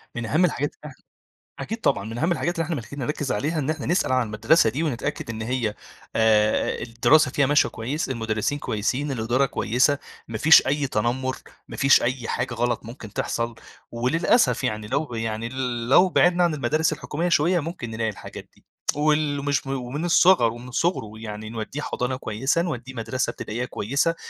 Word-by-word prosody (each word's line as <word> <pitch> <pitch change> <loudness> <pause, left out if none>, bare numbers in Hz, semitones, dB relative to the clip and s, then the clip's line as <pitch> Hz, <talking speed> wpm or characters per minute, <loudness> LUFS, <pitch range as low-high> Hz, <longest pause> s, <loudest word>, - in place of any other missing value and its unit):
من 120 -1 -3
أهم 160 +10 +3
الحاجات 145 -3 -1
اللي - - -17
إح - - -20 0.6
أكيد 225 - -4
طبعًا. 100 -7 +1
من 115 +2 -6
أهم 165 +7 +1
الحاجات 175 0 -1
اللي 165 - 0
إحنا 165 +1 -2
محتاجين 140 +2 -7
نركّز 145 +1 -2
عليها، 155 +9 -1
إن 140 +1 -2
احنا 155 -2 -2
نسأل 175 -5 +1
عن 130 -2 +2
المدرسة 110 +5 +3
دي، 145 +8 -2
ونتأكد 125 -5 -3
إن 110 -1 -5
هي 115 -2 -1 0.4
آآ 110 -1 +2
الدراسة 120 +4 +3
فيها 140 - +2
ماشية 145 +2 +3
كويس، 130 +6 -3
المدرسين 110 +3 -1
كويسين، 130 +7 -2
الإدارة 120 +3 +1
كويسة، 130 +4 +1 0.3
ما 110 -1 -4
فيش 160 +4 +7
أي 140 0 +1
تنمُّر، 130 +3 -1 0.3
ما - - -9
فيش 135 0 +5
أي 125 -1 -2
حاجة 125 0 -2
غلط 120 -1 -1
ممكن 115 -3 -10
تحصل. 115 0 -2 0.4
وللأسف 160 - +2
يعني 105 -4 -2
لو 140 +7 0
ب 125 - -11
يعني 115 0 -3 0.4
لو 180 +7 +6
بِعدنا 175 0 +3
عن 170 - +2
المدارس 155 +3 +1
الحكومية 165 +3 -3
شوية، 170 +2 +3
ممكن 160 -6 -5
نلاقي 110 0 -1
الحاجات 105 - -9
دي. - - -27 0.3
وال 150 -1 +1
مش 140 -1 0
م - - -5
ومن 135 +4 -3
الصِغَر. 175 -8 +5
ومن 120 +2 -10
صُغره 130 - 0
يعني 110 -1 -7
نودّيه 115 +6 -5
حضانة 125 -2 -2
كويسة، 130 +7 -1
نودّيه 130 -7 -4
مدرسة 115 +2 -2
ابتدائية 120 +4 -4
كويسة، 140 +9 0
130 Hz, 185 wpm, -24 LUFS, 115-150 Hz, 0.6 s, فيش